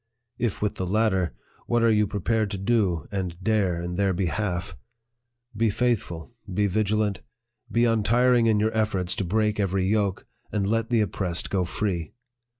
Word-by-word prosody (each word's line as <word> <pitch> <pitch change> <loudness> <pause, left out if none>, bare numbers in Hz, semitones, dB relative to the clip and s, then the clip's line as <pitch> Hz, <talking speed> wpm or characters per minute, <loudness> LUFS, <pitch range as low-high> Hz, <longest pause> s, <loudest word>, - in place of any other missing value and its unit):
If 115 -4 -1
with 105 - -1
the 95 - -2
latter, 95 -3 +1 0.3
what 120 -1 +2
are 115 - +5
you 105 -1 +3
pre 100 0 -4
pared 110 +1 +1
to 100 - -4
do 95 -6 +1
and 95 -4 -3
dare 95 -5 +1
in 85 +1 -4
their 100 -1 +2
behalf? 95 +1 -2 0.8
Be 115 +1 +2
faithful, 105 -5 -1 0.2
be 105 +3 +1
vigilant, 105 0 0 0.5
be 115 +2 +3
untiring 115 +2 +3
in 110 -2 +3
your 110 +1 0
efforts 100 -5 0
to - - 0
break 105 +3 0
every 95 -1 +1
yoke, 100 -1 0 0.3
and 105 -2 0
let 115 +2 0
the 115 -2 +3
oppressed 90 -4 -1
go 95 -2 +1
free. 85 -3 -2
105 Hz, 165 wpm, -25 LUFS, 95-110 Hz, 0.8 s, are